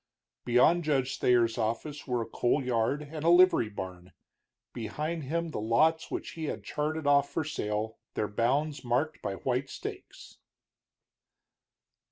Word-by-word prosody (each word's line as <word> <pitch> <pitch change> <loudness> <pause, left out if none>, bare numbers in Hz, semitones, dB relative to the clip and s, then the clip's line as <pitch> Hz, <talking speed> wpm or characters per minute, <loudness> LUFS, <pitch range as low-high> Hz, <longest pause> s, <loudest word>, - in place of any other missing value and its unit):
Beyond 125 +8 +4
Judge 135 -4 0
Thayer's 120 -2 +3
office 115 +8 -3
were 125 -2 0
a - - -8
coal 120 +5 0
yard 125 +4 0
and 155 -1 -5
a 165 - +4
livery 175 -10 +6
barn; 90 -3 -8 0.6
behind 150 +8 -4
him 170 +4 -2
the 155 - -4
lots 155 +9 +2
which - - -4
he 160 -1 -5
had - - -4
charted 155 +1 -2
off 140 0 +4
for 160 - -1
sale, 110 -6 -3 0.2
their 105 - 0
bounds 140 +8 0
marked 125 +6 0
by 100 - -3
white 130 +5 -2
stakes. 415 +4 -9
135 Hz, 145 wpm, -29 LUFS, 115-155 Hz, 0.6 s, livery